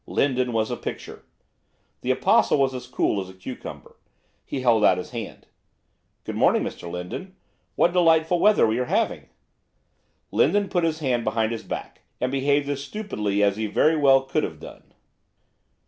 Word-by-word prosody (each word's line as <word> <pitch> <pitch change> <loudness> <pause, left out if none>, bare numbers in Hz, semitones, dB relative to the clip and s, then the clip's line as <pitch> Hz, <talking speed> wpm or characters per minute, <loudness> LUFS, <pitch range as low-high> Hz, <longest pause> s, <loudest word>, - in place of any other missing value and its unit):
Lindon 130 -3 0
was 110 -1 0
a - - -2
picture. - - -7 0.8
The - - -4
Apostle - - +3
was 135 -1 +2
as 125 -1 -7
cool 105 -4 0
as 95 - -8
a 95 - -13
cucumber. 95 - -9 0.5
He 135 - -5
held 115 -4 +3
out 95 - +5
his 90 - -6
hand. 115 -4 -7 0.8
'Good - - -6
morning, - - +3
Mr 85 - -6
Lindon. 90 - -7 0.4
What 175 - +3
delightful 165 -1 +3
weather 210 +3 +5
we 110 +2 0
are 125 - 0
having.' - - -1 1.0
Lindon 205 -1 +2
put 175 -2 0
his 160 -1 -1
hand 125 -5 0
behind 110 0 0
his 115 - -4
back, - - -7 0.2
and 125 +1 -1
behaved 140 +1 +1
as 140 -1 -3
stupidly 105 - -2
as 100 0 +2
he 110 0 -2
very 155 +9 +3
well 135 -3 +5
could 135 - -1
have - - -5
done. - - -13
130 Hz, 170 wpm, -24 LUFS, 110-155 Hz, 1.0 s, out